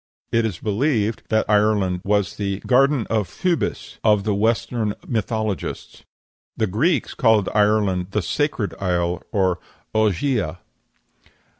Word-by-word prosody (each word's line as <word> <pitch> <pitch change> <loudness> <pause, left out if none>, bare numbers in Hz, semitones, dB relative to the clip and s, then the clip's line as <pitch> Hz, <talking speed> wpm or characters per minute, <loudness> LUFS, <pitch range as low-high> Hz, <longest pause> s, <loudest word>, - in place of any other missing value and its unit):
It 115 -1 +2
is 95 -6 -5
believed 110 - 0
that 110 0 +1
Ireland 105 -4 +2
was 100 -2 0
the 100 -1 -2
"Garden 135 -1 +3
of 110 -4 +1
Phoebus" 180 -3 -2
of 105 -2 +4
the 105 0 0
Western 110 +1 0
mythologists. 110 -3 -3 0.6
The 110 - +2
Greeks 130 - 0
called 110 -5 +3
Ireland 105 -4 +2
the 105 0 -1
"Sacred 145 - -1
Isle" 90 -2 0
and 95 -4 +1 0.4
"Ogygia." 110 - +1
105 Hz, 120 wpm, -22 LUFS, 100-115 Hz, 0.6 s, of